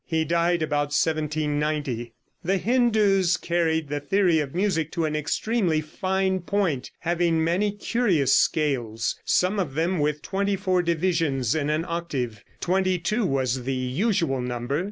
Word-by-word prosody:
He 160 -1 0
died 170 +1 +1
about 145 -1 0
1790.)] 150 -5 -1 0.3
The 190 +3 +1
Hindoos 205 -4 +3
carried 160 -2 0
the 145 +1 -2
theory 180 +1 +2
of 145 0 -4
music 175 -5 0
to 170 -2 0
an 155 -1 -2
extremely 170 +3 0
fine 190 +4 -1
point, 175 -7 -1
having 170 -1 +1
many 185 +6 +1
curious 200 - +1
scales, 120 -7 +1
some 185 +3 +2
of 150 -8 -2
them 170 +3 0
with 150 0 -1
twenty 200 +1 0
four 185 -2 +1
divisions 165 -7 0
in 150 -2 -1
an 155 +2 0
octave. 135 -10 -3 0.2
Twenty 185 0 +1
two 210 +5 0
was 130 -3 0
the 135 0 -1
usual 135 - 0
number. 125 +3 -2
165 Hz, 145 wpm, -25 LUFS, 145-185 Hz, 0.3 s, Hindoos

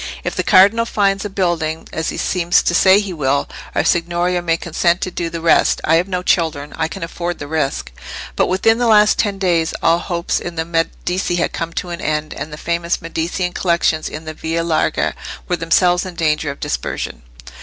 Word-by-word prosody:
"If - - -3
the - - 0
cardinal 210 +5 +5
finds 195 -2 +1
a - - -3
building, 175 -4 -1
as 160 0 -2
he - - -5
seems 175 -1 +2
to - - +1
say 190 +3 +6
he 200 -3 -4
will, 140 -3 0 0.3
our - - +2
Signoria 175 +1 +1
may 165 -1 +1
consent 170 +1 0
to 185 - -2
do 170 -1 -3
the 165 0 -5
rest. 165 - +3
I 160 +1 +4
have 175 +3 0
no 180 -2 -3
children, 155 -5 0
I 160 - -1
can 185 +2 -7
afford 175 +1 -4
the 145 - -7
risk." 140 - -2 0.4
But - - +2
within 225 +5 +2
the 240 - +2
last 210 -1 +5
ten 205 -2 +1
days 175 -4 +1
all 165 +1 +4
hopes 175 -1 -2
in 175 -1 -6
the 160 0 -2
Medici 175 +2 -1
had 175 - -1
come 165 0 -3
to 180 - -4
an 175 +1 -5
end: 155 0 -2
and 155 - -6
the 150 - -7
famous 170 +1 -1
Medicean 170 +2 -3
collections 170 -3 +1
in 155 +1 -8
the 155 - -5
Via 165 +2 -2
Larga 165 -2 0 0.3
were 180 - 0
themselves 175 +2 +2
in 185 -2 -7
danger 155 -2 0
of 140 - -6
dispersion. - - -4
170 Hz, 210 wpm, -18 LUFS, 160-180 Hz, 0.4 s, say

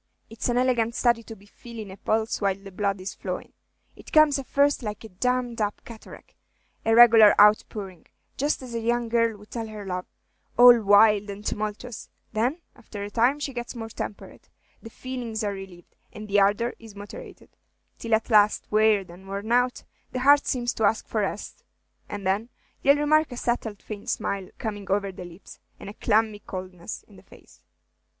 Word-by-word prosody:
It's 225 +2 -3
an 240 - +1
elegant 240 -2 +1
study 235 -2 +2
to 225 0 -10
be 200 -1 -19
feelin' 220 -1 -10
a - - -9
pulse 220 +1 -1
while 195 -1 +1
the 195 0 -13
blood 195 0 -1
is 185 +1 -6
flowin'. - - -6 0.4
It - - -14
comes 310 -2 +5
at 270 - -8
first 285 0 +2
like 210 -2 -6
a 220 - -10
dammed 245 +3 -1
up 205 0 -3
cataract, 230 -2 -13 0.5
a 225 0 +3
regular 225 -3 +8
out 210 +1 +7
pouring, 190 -6 -9 0.3
just 290 -1 -1
as 245 -2 -9
a 230 - -2
young 235 +1 -1
girl 230 -2 +1
would 210 +1 -17
tell 230 -2 -4
her 210 -2 -8
love, 180 -1 -4 0.5
all 245 -1 +8
wild 205 0 +5
and 200 +1 -8
tumultuous; 215 +3 -5 0.2
then, 245 +10 0
after 215 -4 -9
a 205 - -6
time, 245 +6 +2
she 280 -2 -4
gets 240 +1 -6
more 225 -1 -6
temperate, 210 - -8 0.3
the 225 - -10
feelings 240 -3 -5
are 205 -1 -1
relieved, 190 -3 -11 0.2
and 215 0 -9
the 205 0 +3
ardor 205 +5 +2
is 225 -3 -13
moderated, 205 0 -11 0.4
till 230 -1 +1
at 225 +2 -3
last, 210 -1 +4
wearied 210 -4 +3
and 185 +3 -14
worn 200 +3 -5
out, 245 +1 +2 0.3
the 255 - -2
heart 285 +2 +5
seems 245 -2 -1
to 220 - -3
ask 215 +1 +1
for 220 - -1
rest; 205 +1 -5 0.5
and 205 -2 -6
then 200 +5 0 0.3
ye'll 280 +1 +5
remark 305 0 +2
a 245 - -7
settled 230 -4 -3
faint 205 -2 -7
smile 195 -2 -2
coming 205 -3 -5
over 200 0 0
the 180 -1 -9
lips, 175 +2 -13 0.2
and 200 - -8
a - - -13
clammy 215 -1 +1
coldness 185 -1 -8
in 205 - -18
the - - -15
face." 195 - -19
220 Hz, 190 wpm, -25 LUFS, 200-240 Hz, 0.5 s, regular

